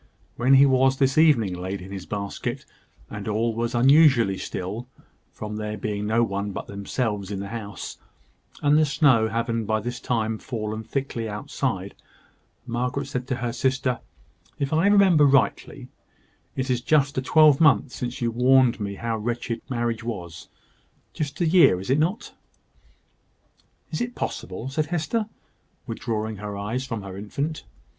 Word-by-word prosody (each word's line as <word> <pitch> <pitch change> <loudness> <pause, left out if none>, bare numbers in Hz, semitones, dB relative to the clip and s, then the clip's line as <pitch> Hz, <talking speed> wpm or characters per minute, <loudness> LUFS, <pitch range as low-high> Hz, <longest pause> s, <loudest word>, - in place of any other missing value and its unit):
When 130 +3 +4
he 135 +1 +7
was 130 0 +3
this 135 -1 +2
evening 125 - +4
laid 95 +2 -4
in 95 +2 -10
his 95 -2 -7
basket, 100 -1 -4 0.4
and 105 0 -7
all 110 +2 0
was 115 +1 -2
unusually 130 -6 +5
still, 105 +7 -5 0.4
from 105 0 -6
there 105 0 -4
being 105 0 -3
no 115 +2 +3
one 100 -2 -2
but - - -5
themselves 100 0 -3
in 100 -2 -4
the 100 0 -5
house, 110 -3 -7 0.6
and 145 +1 +5
the 155 - +4
snow 130 -6 +4
having 115 0 -1
by 110 0 +1
this 120 +3 -5
time 110 -3 -1
fallen 110 -3 -4
thickly 120 -3 -3
outside, 105 0 -3 0.7
Margaret 125 +3 -2
said 125 0 -4
to 130 - -1
her 120 - -2
sister 130 0 0 0.6
"If 140 +1 -2
I 165 +5 +3
remember 190 -7 +6
rightly, 135 -7 +1 0.7
it 130 0 -1
is 125 -1 0
just 140 0 +2
a - - -2
twelvemonth 150 -1 +5
since 125 -1 -5
you 120 -1 +1
warned 125 +1 +4
me 100 -1 -4
how 115 +1 -3
wretched 115 +1 -3
marriage 120 -2 -2
was. 90 -8 -6 0.7
Just 145 -3 -4
a - - +3
year, 160 - +5
is 95 +7 -4
it 140 - +3
not?" 180 +9 -1 1.6
"Is - - -3
it 240 0 -3
possible?" 95 +6 -5
said 150 +3 -1
Hester, 175 +7 -1 0.6
withdrawing 110 -1 -3
her 105 0 -6
eyes 115 +6 -3
from 115 -5 -4
her 95 -1 -8
infant. 140 +10 -4
120 Hz, 155 wpm, -24 LUFS, 105-135 Hz, 1.6 s, he